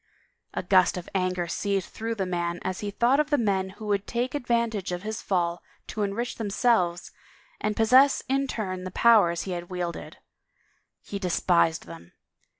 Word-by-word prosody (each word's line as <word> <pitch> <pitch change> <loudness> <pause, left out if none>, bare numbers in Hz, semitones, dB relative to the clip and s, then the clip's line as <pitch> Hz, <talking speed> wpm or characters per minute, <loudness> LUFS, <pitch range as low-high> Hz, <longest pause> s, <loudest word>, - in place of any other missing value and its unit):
A - - -2
gust 185 0 +4
of 175 - -6
anger 185 -2 0
seethed 195 +2 -1
through 225 +1 -4
the 195 -3 -1
man 175 -1 -2
as 185 0 -3
he 205 - -3
thought 240 +7 +2
of 300 -1 +1
the 290 - +3
men 195 -5 0
who 215 - -8
would 205 -1 -1
take 245 +2 -2
advantage 235 -8 -1
of 180 +1 -4
his 215 0 -4
fall 175 -2 -1 0.2
to 215 - -5
enrich 205 +4 -2
themselves 205 -5 +1 0.5
and 215 0 -1
possess 255 +5 +5
in 275 +1 +1
turn 185 -7 -4
the 185 - -4
powers 185 -5 +4
he 190 - -5
had 175 -1 -5
wielded. 175 -2 -5 0.9
He 200 - -5
despised 175 -3 +1
them. 85 0 -12
195 Hz, 170 wpm, -26 LUFS, 180-230 Hz, 0.9 s, possess